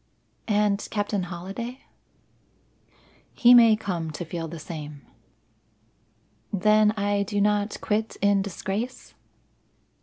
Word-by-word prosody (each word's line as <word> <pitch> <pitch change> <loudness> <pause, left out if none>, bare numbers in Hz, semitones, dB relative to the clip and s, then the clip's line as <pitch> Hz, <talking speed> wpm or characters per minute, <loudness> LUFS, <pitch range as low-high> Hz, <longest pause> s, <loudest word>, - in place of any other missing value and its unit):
"And 210 -2 +1
Captain 205 -2 -1
Holliday?" 195 +9 -6 1.5
"He 245 0 +6
may 230 -3 +7
come 180 -7 -4
to 165 +3 -6
feel 165 0 -5
the 165 +1 -8
same." 150 -3 -8 1.5
"Then 210 +2 +4
I 205 0 0
do 205 +1 -2
not 205 0 +1
quit 215 +1 -1
in 200 0 +3
disgrace?" 200 +6 -5
205 Hz, 100 wpm, -25 LUFS, 180-215 Hz, 1.5 s, may